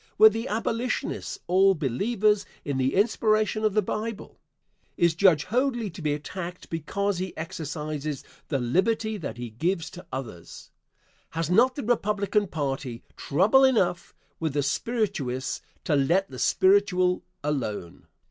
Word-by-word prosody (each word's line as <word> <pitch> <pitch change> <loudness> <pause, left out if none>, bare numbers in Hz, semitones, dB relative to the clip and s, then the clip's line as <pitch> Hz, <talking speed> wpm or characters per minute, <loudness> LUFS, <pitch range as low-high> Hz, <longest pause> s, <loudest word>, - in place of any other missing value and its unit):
Were 220 +1 +9
the 225 +3 -4
abolitionists 230 +3 -2
all 190 +2 +4
believers 200 - +1 0.2
in 140 -2 -1
the 130 +1 +1
inspiration 215 +1 +2
of 215 -2 +1
the 215 - +3
Bible? 215 +2 -5 0.6
Is 170 -1 +3
Judge 165 -4 +4
Hoadly 240 - 0
to 170 - -10
be 150 -1 0
attacked 180 +4 -7
because 185 +4 -1
he 185 0 -5
exercises 155 -2 -4 0.2
the 140 - 0
liberty 215 - +1
that 150 - -6
he 120 -2 -6
gives 165 - -1
to 180 +1 -11
others? 115 -10 -8 0.7
Has 165 0 -1
not 250 +7 +4
the 285 - -4
Republican 210 -3 +1
party 135 -6 -3
trouble 200 - +3
enough 190 -10 +2 0.2
with 160 -3 -1
the 145 -1 +1
spirituous 140 - -1 0.2
to 155 - +1
let 170 +7 +2
the 130 - -8
spiritual 185 -2 +3 0.2
alone? 115 - -3
180 Hz, 140 wpm, -26 LUFS, 145-215 Hz, 0.7 s, Were